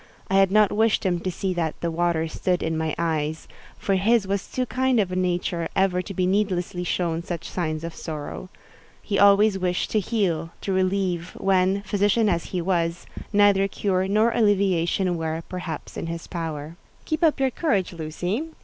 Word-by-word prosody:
I - - +1
had 195 -1 +4
not 210 0 +5
wished 220 -1 +2
him 175 -2 +1
to 185 - -3
see 185 +1 -2
that 165 -3 -2
"the 170 - -1
water 165 -1 0
stood 180 +2 -1
in 160 0 -1
my 160 -1 -1
eyes," 160 -1 -2 0.3
for 195 - -1
his 220 +2 +3
was 200 0 -2
too 255 - -1
kind 255 -1 +1
a 185 -3 0
nature 175 -2 -1
ever 190 -1 +2
to 195 - -7
be 185 - +1
needlessly 185 -2 0
shown 170 -1 -1
such 170 -2 -5
signs 155 -3 -3
of 165 -1 -5
sorrow. 155 +3 -6 0.5
He 200 - -1
always 200 0 +5
wished 180 -1 -1
to 215 - +3
heal—to 190 -4 -2
relieve—when, 185 +1 +1
physician 205 +2 +2
as 170 -3 0
he 180 -2 -3
was, 170 -2 0 0.3
neither 205 -2 +4
cure 190 -1 0
nor 215 +4 +3
alleviation 190 -4 +2
were, 160 0 -3
perhaps, 180 -4 -6
in - - -4
his 165 0 -5
power. 160 -2 -5 0.3
"Keep 310 +1 -2
up 310 -3 +3
your 265 -1 +2
courage, 205 - 0
Lucy. 175 - -3
185 Hz, 175 wpm, -24 LUFS, 170-200 Hz, 0.5 s, not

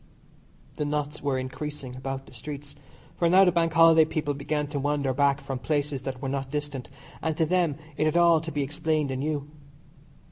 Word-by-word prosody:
The 150 - -1
knots 150 0 -2
were 140 -2 0
increasing 130 0 -5
about 135 +1 -5
the - - -16
streets, 145 -1 -8 0.4
for 170 - +3
now 190 +2 +7
the 180 - +4
Bank 165 -1 +2
Holiday 165 -1 +7
people 155 -2 -1
began 150 +1 -2
to 145 -1 -2
wander 140 -1 0
back 140 +1 +3
from 135 -2 -5
places 145 -2 -1
that 135 0 -5
were - - -1
not 135 0 -2
distant, 145 -3 -4 0.3
and 160 -1 -1
to 160 - +3
them 175 -3 +2 0.2
it 155 - +2
had 155 +2 +2
all 170 -2 +5
to 165 0 -6
be 145 -2 -1
explained 150 0 -1
anew. 145 +2 -2
145 Hz, 190 wpm, -27 LUFS, 135-155 Hz, 0.4 s, now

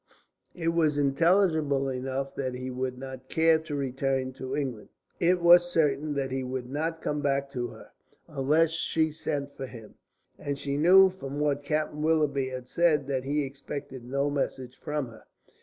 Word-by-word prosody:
It 165 -2 -1
was 160 -3 +2
intelligible 150 -1 +2
enough 135 +1 -3
that 130 -2 -3
he 130 +1 -5
would 130 0 -3
not 130 0 -9
care 160 0 +4
to 155 -2 -6
return 135 -1 -1
to 130 0 -5
England. 130 -7 -4 0.3
It 180 +1 +3
was 175 +1 +7
certain 150 -2 +1
that 135 -2 -2
he 130 0 -1
would 130 -1 -4
not 160 +3 -2
come 150 0 -1
back 140 -1 0
to 125 -2 -2
her, - - -13 0.4
unless 155 +3 +2
she 160 -1 0
sent 145 -2 -3
for 135 - -5
him. 115 -4 -12 0.5
And 140 -1 -3
she 140 0 -3
knew 185 +5 +7
from 145 -6 -6
what 145 -1 +1
Captain 150 +1 -2
Willoughby 150 -4 +1
had 130 -1 -7
said 155 -1 +2
that 130 -1 -1
he 145 +2 0
expected 140 -1 -7
no 140 +3 -1
message 130 -3 -3
from 150 -4 -3
her. 110 - -15
140 Hz, 175 wpm, -28 LUFS, 130-155 Hz, 0.5 s, was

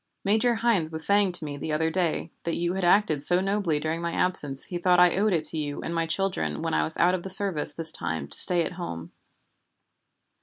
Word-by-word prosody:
Major 220 +4 0
Hynes 220 -8 -1
was 160 0 +10
saying 200 -2 +6
to 170 -3 -5
me 145 -1 -8
the 155 - -7
other 160 +1 -2
day 170 -2 -3
that 170 - -5
you 175 +1 -3
had 190 0 -5
acted 175 -5 +1
so 175 +5 +3
nobly 195 -5 -2
during 160 +2 -5
my 170 0 -5
absence 145 -7 -2
he 175 - -7
thought 180 0 +1
I 180 -1 +3
owed 210 +3 -1
it 165 -4 -2
to 160 - -6
you 145 -1 -6
and 165 - -6
my 165 -1 -3
children 165 - -4
when - - -4
I 80 0 0
was 80 - -6
out 175 +2 +1
of 185 - -4
the 190 - -9
service 190 -6 +1
this 160 0 0
time 80 - -5
to - - +4
stay 175 -2 +5
at - - -7
home. 170 - -9
170 Hz, 235 wpm, -24 LUFS, 155-190 Hz, -, was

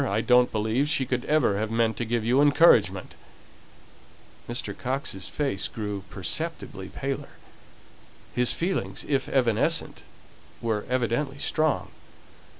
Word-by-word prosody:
I 105 +3 +1
don't 125 +1 +4
believe 110 +7 0
she 135 -3 +2
could 125 0 -2
ever 135 -10 +2
have 110 0 -1
meant 115 -1 +1
to 120 - -2
give 115 -1 -1
you 125 +4 +4
encouragement!" 120 - +4 1.4
Mr. 120 - -3
Coxe's 130 -7 -3
face 135 -11 0
grew 105 -3 -5
perceptibly - - -4
paler. - - -5 1.0
His 125 0 +2
feelings, 185 +3 -2
if 140 -2 0
evanescent, 120 -5 +1 0.6
were 110 -3 -2
evidently 130 +3 0
strong. 155 +1 0
120 Hz, 120 wpm, -26 LUFS, 110-140 Hz, 1.4 s, don't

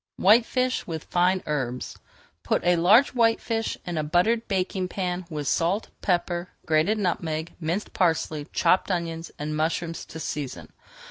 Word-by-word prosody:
WHITEFISH 245 +5 +3
WITH 160 -3 -4
FINE 180 +2 +1
HERBS 130 -5 -3 0.4
Put - - 0
a 175 0 +5
large 200 +11 +6
whitefish 225 -1 +1
in 175 -3 -2
a - - 0
buttered 180 +10 +2
baking 190 -1 -1
pan 180 -1 -3
with 150 -3 -4
salt, 180 +6 +1
pepper, 175 -1 0 0.2
grated 160 +6 +2
nutmeg, 165 -4 -2
minced 170 +5 -3
parsley, 160 -4 0
chopped 180 +3 +2
onions, 170 -2 -2
and 150 +1 -3
mushrooms 165 +2 -1
to 160 - -9
season. 145 -4 -5
175 Hz, 140 wpm, -25 LUFS, 160-195 Hz, 0.4 s, large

